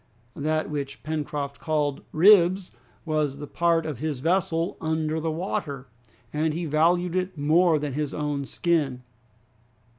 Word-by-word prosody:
'" 120 - -37
That 155 -1 0
which 140 -2 -5
Pencroft 145 -2 -3
called 150 -3 -1
ribs 185 +1 +5 0.3
was 155 -3 0
the 145 - -6
part 165 +1 +1
of 150 -6 -4
his 155 -3 -2
vessel 170 +2 0
under 160 0 -1
water, 155 -5 -3 0.4
and 155 +1 0
he 170 +1 -2
valued 170 +4 +2
it 185 -1 -2
more 160 +3 +4
than 145 -2 -3
his 150 0 -2
own 145 -2 -2
skin. 145 -6 0
155 Hz, 140 wpm, -25 LUFS, 145-170 Hz, 0.4 s, ribs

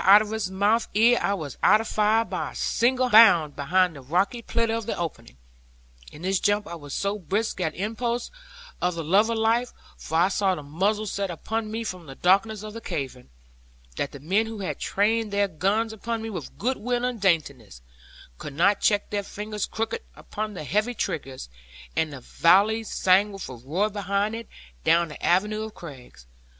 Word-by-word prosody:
out 200 +2 +9
of 215 - -8
his 220 -4 -2
mouth 205 +4 +1
ere 235 +3 +5
I 200 - +1
was 150 -8 -7
out 210 +2 +6
of 225 - -4
fire, 215 +2 +2
by - - -4
a - - -16
single 255 +1 +1
bound 170 -9 +7
behind 175 +4 +2
the 140 - -9
rocky 185 - 0
pillar 230 0 0
of 230 -2 -3
the - - -2
opening. 115 - -6 0.7
In 155 - -12
this 190 0 +1
jump 205 0 +1
I - - -7
was 145 -4 -7
so 200 +1 -1
brisk, 200 +3 -2
at 160 -3 -1
impulse 235 +4 -2 0.5
of 180 -1 0
the 165 - -4
love 200 +8 +3
of 230 - 0
life 230 +3 +1 0.2
(for 160 - -3
I 175 +3 +4
saw 195 -1 +1
the 150 - -8
muzzles 200 +8 -1
set 195 -1 -2
upon 215 +6 -3
me 225 +1 -3
from 180 -6 -6
the 135 - -9
darkness 200 +5 +2
of 215 0 -7
the 230 - -7
cavern), 130 - -5 0.7
that 140 - -2
the 140 - -10
men 195 +10 +1
who 220 -2 -6
had 190 - -4
trained 220 +2 0
their 200 0 +2
guns 200 +6 0
upon 225 +1 -4
me 225 - -5
with 175 -8 -7
goodwill 245 0 -1
and 245 -4 -3
daintiness, 140 - 0 0.6
could 145 - -7
not 190 +7 +3
check 205 -1 +1
their 205 -1 0
fingers 210 +1 -5
crooked 225 0 -3
upon 215 0 -6
the 180 - -6
heavy 215 - 0
triggers; 140 - -4 0.5
and 160 -1 0
the 140 -2 -9
volley 200 - +3
sang 195 0 +3
with 195 -1 -7
a - - -8
roar 145 - -1
behind 200 0 -1
it, 230 0 -6 0.4
down 170 - +3
the 150 - -11
avenue 210 +4 +2
of 220 -1 -7
crags. 130 - -12
200 Hz, 195 wpm, -25 LUFS, 170-220 Hz, 0.7 s, out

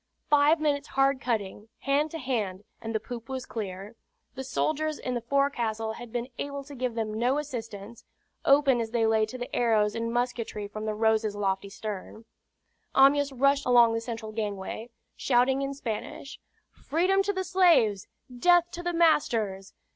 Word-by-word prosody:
Five 295 +2 +5
minutes' 290 -1 0
hard 270 0 +1
cutting, 215 -3 -3
hand 285 +3 +1
to 325 - -6
hand, 215 -9 -3 0.2
and 225 0 -5
the - - +2
poop 230 +1 -8
was 260 -1 -4
clear. 200 0 -6 0.4
The 265 - -6
soldiers 310 +4 -1
in 255 - -4
the 240 - -2
forecastle 235 -4 0
had 240 0 -10
been 240 0 -3
able 280 0 -4
to 285 +1 -12
give 250 -3 -3
them 220 -2 -2
no 250 +4 +2
assistance, 230 -6 -6 0.4
open 275 -3 +4
as 225 - -3
they 230 -1 +1
lay 220 -1 +2
to 255 - -7
the 245 0 -6
arrows 215 -3 +2
and 230 0 -3
musketry 235 -3 -2
from 215 +1 -6
the 215 - -1
Rose's 220 -1 +1
lofty 195 -1 -1
stern. 215 +2 -7 0.7
Amyas 280 +1 +5
rushed 275 +1 +2
along 240 -2 +6
the 225 - -1
central 225 -2 -6
gangway, 215 +1 -4 0.3
shouting 260 +1 +2
in 275 0 -3
Spanish, 250 +2 -6 0.3
"Freedom 365 +6 +1
to 400 +1 0
the 375 -1 -2
slaves! 335 - +3 0.3
death 350 +2 +4
to 350 - -6
the 350 0 -2
masters!" 235 - +1
240 Hz, 170 wpm, -27 LUFS, 220-280 Hz, 0.7 s, along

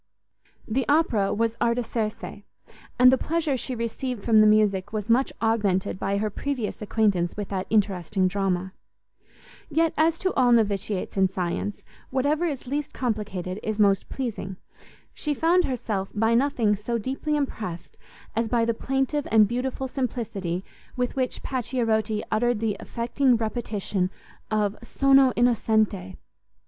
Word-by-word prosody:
The 255 +4 0
opera 250 -10 +3
was 225 +1 0
Artaserse; 230 -3 -2 0.6
and 250 0 +8
the 260 - +3
pleasure 320 -3 0
she 255 0 -4
received 235 0 -4
from 225 -2 +5
the 215 - +7
music 210 -3 +3
was 215 0 -2
much 260 +3 +3
augmented 205 -4 +1
by 195 +1 0
her 210 +1 -1
previous 250 -2 -3
acquaintance 200 -5 +1
with 205 -2 -4
that 190 -2 -3
interesting 195 -3 +1
drama; 190 -1 -1 1.0
yet, 325 +2 +2
as 320 +2 +3
to 375 +2 -1
all 250 -2 +3
noviciates 205 -4 +1
in 190 -1 +5
science, 185 +2 -3 0.3
whatever 290 +6 +1
is 285 -6 -3
least 285 +3 -3
complicated 210 -6 -3
is 215 -1 -3
most 200 -2 +3
pleasing, 220 -7 -4 0.6
she 300 -1 -2
found 340 +4 +3
herself 215 -6 -2
by 225 +2 +2
nothing 235 -4 +2
so 225 +4 -2
deeply 270 +6 -2
impressed, 220 - -4 0.4
as 225 0 0
by 235 -1 +2
the 230 - +1
plaintive 270 +4 -1
and 215 -2 +6
beautiful 255 +3 -2
simplicity 220 -9 -3 0.3
with 250 -1 -1
which 255 -2 -2
Pacchierotti 225 -4 -1
uttered 240 0 +1
the 220 -2 0
affecting 245 +2 +1
repetition 215 -4 -2 0.4
of 210 -1 0
sono 270 +2 +4
innocente! 220 -5 +1
225 Hz, 140 wpm, -25 LUFS, 205-255 Hz, 1.0 s, and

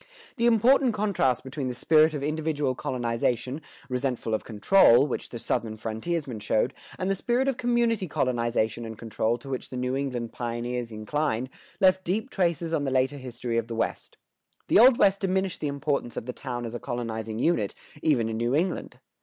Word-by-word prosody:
The 235 0 +3
important 240 +2 +4
contrast 195 - +1
between 135 0 -4
the 125 - -3
spirit 155 +4 +4
of 140 - -3
individual 150 -2 -1
colonization, 125 +3 -2 0.3
resentful 125 -3 -2
of 110 - 0
control, 120 - +5
which 145 - -4
the 120 - -6
Southern 110 -1 -2
frontiersmen 115 +4 -3
showed, 105 +1 +1 0.2
and 185 - -2
the 195 - +2
spirit 240 +7 0
of 270 -3 0
community 235 -5 +1
colonization 120 -4 0
and 110 -1 -7
control 115 +1 -1
to 120 - -14
which 130 -2 -4
the 130 - -6
New 125 +1 -1
England 125 -4 -3
pioneers 120 0 -3
inclined, 125 +3 -2 0.3
left 190 0 +4
deep 215 +9 -2
traces 170 -3 0
on 150 -3 +1
the 135 - 0
later 130 +2 +1
history 120 -2 -3
of 115 - -5
the 115 - -5
West.[125:1] 115 - -6
The - - +6
Old 245 +1 +8
West 195 0 +4
diminished 190 -1 0
the 150 - 0
importance 140 -3 -2
of - - -4
the 125 - -4
town 120 -3 -5
as 115 - -6
a 120 - -4
colonizing 110 -2 -4
unit, 115 - +1 0.3
even 125 -8 +2
in 110 0 -3
New 120 +3 +1
England. 175 +3 -1
130 Hz, 185 wpm, -27 LUFS, 120-170 Hz, 0.3 s, Old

